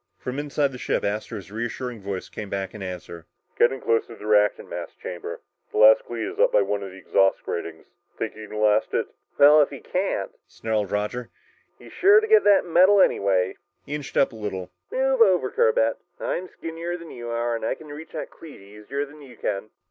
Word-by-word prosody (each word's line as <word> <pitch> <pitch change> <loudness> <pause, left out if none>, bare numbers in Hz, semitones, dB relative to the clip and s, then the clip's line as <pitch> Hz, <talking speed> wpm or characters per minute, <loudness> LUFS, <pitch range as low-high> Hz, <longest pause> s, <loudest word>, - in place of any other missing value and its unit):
From 125 +7 -5
inside 145 -1 0
the 125 - -9
ship, - - -1
Astro's 100 -2 -4
reassuring 120 +1 -4
voice 95 -1 -5
came 105 - -7
back 95 -1 -3
in 105 - -9
answer. 90 -3 -7 0.3
"You're - - +7
getting 135 0 -7
close 115 0 +1
to 115 - -10
the 105 - -11
reactant 105 -1 +3
mass - - -7
chamber. 470 +3 -7 0.3
The 430 - -5
last - - +7
cleat - - -4
is 390 +3 -7
up - - +5
by - - +4
one 100 - -2
of 100 - -6
the 95 - -12
exhaust 95 +1 +2
gratings. 80 -1 -5 0.3
Think - - -3
you 110 0 -9
can 105 - -6
last 105 -1 +2
it?" - - 0 0.3
"Well, 150 +2 +8
if 145 - +2
he 140 - -8
can't," 180 - -2 0.2
snarled 110 -3 -2
Roger, 110 +4 -2 0.5
"he's - - -14
sure 405 +3 +6
to 435 - -2
get 440 0 +5
that 200 -2 +5
medal 185 +4 +5
anyway!" 95 - +2 0.3
He 145 - -6
inched 145 -2 -5
up 135 - +4
a - - -12
little. 95 -4 -5 0.2
"Move 265 -1 +1
over, 180 - +4
Corbett, 110 0 +2 0.2
I'm 185 - -3
skinnier 165 +2 -5
than 170 -2 -11
you 120 -1 -7
are, 120 0 -1
and 115 - -5
I - - 0
can 155 - -14
reach 150 +2 -9
that - - -5
cleat 160 -3 -13
easier 105 +8 -5
than 150 +1 -15
you 130 -5 -14
can." 100 +1 -3
120 Hz, 215 wpm, -24 LUFS, 105-165 Hz, 0.5 s, Well